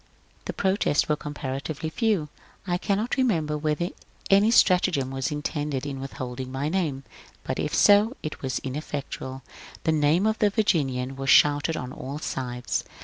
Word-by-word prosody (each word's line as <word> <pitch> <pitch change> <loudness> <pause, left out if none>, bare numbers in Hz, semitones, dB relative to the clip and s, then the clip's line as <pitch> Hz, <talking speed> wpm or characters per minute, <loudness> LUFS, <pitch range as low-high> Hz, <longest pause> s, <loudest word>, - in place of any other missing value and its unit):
The - - -3
protests 190 -5 +1
were 150 - +2
comparatively 145 +1 -5
few. 205 -8 0 0.4
I 175 -1 0
cannot 215 +7 0
remember 165 - +1
whether 155 +3 -1 0.4
any 200 +3 +6
stratagem 180 - +3
was 135 +1 -2
intended 145 -2 -3
in 140 -2 -4
withholding 130 -1 -6
my 135 +3 -2
name, 155 -7 -1 0.4
but - - -3
if - - -1
so 210 +5 +5
it 155 - -5
was 130 -1 -2
ineffectual; 135 -1 -5 0.4
the 160 - +2
name 155 +5 +3
of 220 0 +1
the 210 - +4
^ - - -27
Virginian 135 - +1
" - - -15
was 135 0 -3
shouted 145 +2 +5
on 125 0 -5
all 140 +3 -6
sides. 125 -4 -3
150 Hz, 160 wpm, -26 LUFS, 135-185 Hz, 0.4 s, any